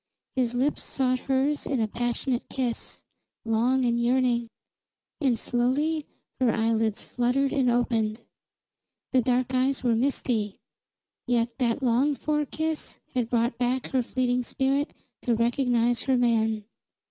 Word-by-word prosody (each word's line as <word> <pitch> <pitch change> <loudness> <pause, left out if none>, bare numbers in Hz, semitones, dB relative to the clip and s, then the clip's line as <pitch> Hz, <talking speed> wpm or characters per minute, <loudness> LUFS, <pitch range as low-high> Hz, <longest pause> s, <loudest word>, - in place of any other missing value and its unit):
His 245 -2 0
lips 270 +4 +1
sought 255 -1 0
hers 270 +2 +1
in 270 -3 0
a 220 - +1
passionate 240 +2 -2
kiss, 250 -3 -3 0.4
long 245 +4 +2
and 235 0 +1
yearning; 240 -1 +2 0.7
and 265 -6 +2
slowly 285 +7 0 0.3
her 250 -3 +3
eyelids 225 -1 0
fluttered 250 +3 0
and 265 -3 +2
opened. 230 -2 0 0.9
The 255 - +4
dark 250 +1 +1
eyes 260 +1 +1
were 240 -2 +3
misty, 225 -4 0 0.7
yet 235 -1 +1
that 245 +1 +1
longed 260 +4 +2
for 300 -1 0
kiss 315 +1 -3
had 245 -3 0
brought 235 0 0
back 250 +1 0
her 260 - +2
fleeting 250 0 0
spirit 270 +3 0 0.3
to 240 - +1
recognize 240 0 +2
her 265 -2 +2
man. 225 -3 +2
245 Hz, 135 wpm, -26 LUFS, 235-265 Hz, 0.9 s, The